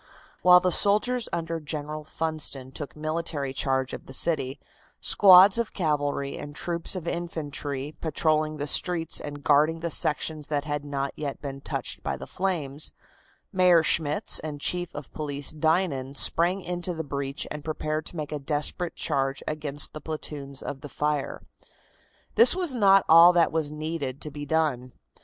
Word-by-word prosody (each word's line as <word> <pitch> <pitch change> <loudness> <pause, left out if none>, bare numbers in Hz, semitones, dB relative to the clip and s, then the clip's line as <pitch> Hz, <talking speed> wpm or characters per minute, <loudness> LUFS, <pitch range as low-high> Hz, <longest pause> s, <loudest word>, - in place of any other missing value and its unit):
While 180 0 +8
the 180 0 0
soldiers 215 +7 +2
under 165 -1 -3
General 150 0 -5
Funston 155 -4 -3
took 145 +1 -7
military 155 -3 -3
charge 130 -1 0
of - - -8
the 130 - -9
city, 135 -3 0 0.4
squads 195 +2 +7
of 235 - -3
cavalry 145 -5 -1
and 145 0 -8
troops 170 +3 -2
of 175 -2 -6
infantry 150 -4 -4
patrolling 155 -1 0
the 145 - -3
streets 165 +2 +2
and 145 -1 -8
guarding 155 +3 +3
the 170 0 -2
sections 150 +1 0
that 145 -1 -2
had 145 -1 -3
not 140 -1 -3
yet 140 -3 -5
been 135 -1 -7
touched - - -4
by - - -3
the - - -8
flames, 155 -7 -3 0.6
Mayor 180 -3 +5
Schmitz 150 -2 +3
and 150 -2 -6
Chief 175 +3 -1
of 145 -1 -8
Police 145 -3 -3
Dinan 155 -4 0
sprang 175 +7 +2
into 175 0 -4
the 160 - -4
breach 140 -1 -4
and 150 -1 -6
prepared 155 0 -3
to - - -5
make 150 -2 -5
a 150 - -3
desperate 150 +4 0
charge 135 0 -1
against 150 -1 -1
the 155 - -8
platoons 145 -3 -5
of 135 - -6
the 145 - -8
fire. 150 -1 -2 0.9
This 240 +6 +6
was 355 -7 -1
not 195 -5 +5
all 170 +2 +8
that 170 -1 +3
was 155 -2 -1
needed 150 -3 -4
to 150 - -6
be 145 0 -7
done. 140 -6 0
155 Hz, 165 wpm, -26 LUFS, 145-170 Hz, 0.9 s, While